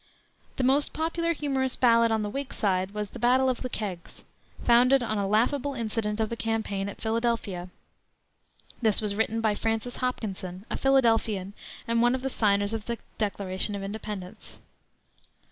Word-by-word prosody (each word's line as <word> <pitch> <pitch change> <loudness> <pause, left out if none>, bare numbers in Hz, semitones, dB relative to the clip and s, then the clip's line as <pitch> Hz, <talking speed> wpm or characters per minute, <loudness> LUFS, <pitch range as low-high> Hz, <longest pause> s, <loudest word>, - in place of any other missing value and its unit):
The 265 - -1
most 275 +3 +3
popular 335 +1 0
humorous 270 -4 -1
ballad 230 -2 +5
on 220 -1 +1
the 205 - -2
Whig 275 +2 -4
side 190 -2 +1
was 210 -1 -4
the - - -8
Battle 255 +3 +4
of 250 - -5
the 255 - -3
Kegs, 195 -7 -6 0.4
founded 250 +2 +5
on 215 -3 -1
a 200 - 0
laughable 255 +7 +1
incident 220 -2 -2
of 220 -1 +1
the 235 - -3
campaign 220 -3 -2
at - - -9
Philadelphia. 220 -5 -1 1.1
This 220 -3 +3
was 210 -2 -1
written 220 +2 0
by 220 -2 +2
Francis 225 +3 -2
Hopkinson, 195 -7 -4
a - - -1
Philadelphian, 225 -7 +2 0.3
and 230 0 +2
one 240 +1 +4
of 260 - -5
the 270 - -1
signers 205 -2 +2
of 220 -2 -3
the 235 0 -2 0.2
Declaration 200 -1 -1
of 200 - -5
Independence. 210 -1 -7
225 Hz, 165 wpm, -27 LUFS, 205-250 Hz, 1.1 s, ballad